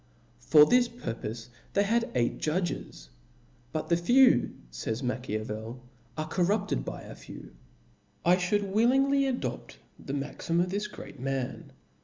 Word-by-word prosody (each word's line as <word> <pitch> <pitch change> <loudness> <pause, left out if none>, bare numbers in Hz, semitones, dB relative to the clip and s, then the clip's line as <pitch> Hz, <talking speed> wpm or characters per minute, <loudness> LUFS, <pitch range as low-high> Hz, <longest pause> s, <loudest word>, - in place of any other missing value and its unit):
For 150 - +7
this 245 +6 +4
pur 235 - -5
^^^]^' 115 - -14
pofe 115 +2 -6 0.2
they 200 - +3
had 235 +3 +1
eight 120 -1 +1
judges: 155 - -3 0.6
but 155 0 -3
tbejewy 240 +11 +5 0.2
fays 110 - -4
Ma 125 - +1
chap, 125 - -13
7. 110 0 -2
chiavcl, 110 +3 -6 0.4
are 155 0 -2
corrupted 180 - 0
by - - -6
a - - -9
few. - - -11 0.7
I 175 +1 +6
ftiould 200 +2 0
willingly 270 +6 +3
adopt 255 -2 -4 0.3
the 135 - -5
maxim 145 +4 -2
of 180 +1 +1
this 205 +2 -1
great - - -11
man. 135 -1 -3
170 Hz, 155 wpm, -29 LUFS, -, 0.7 s, For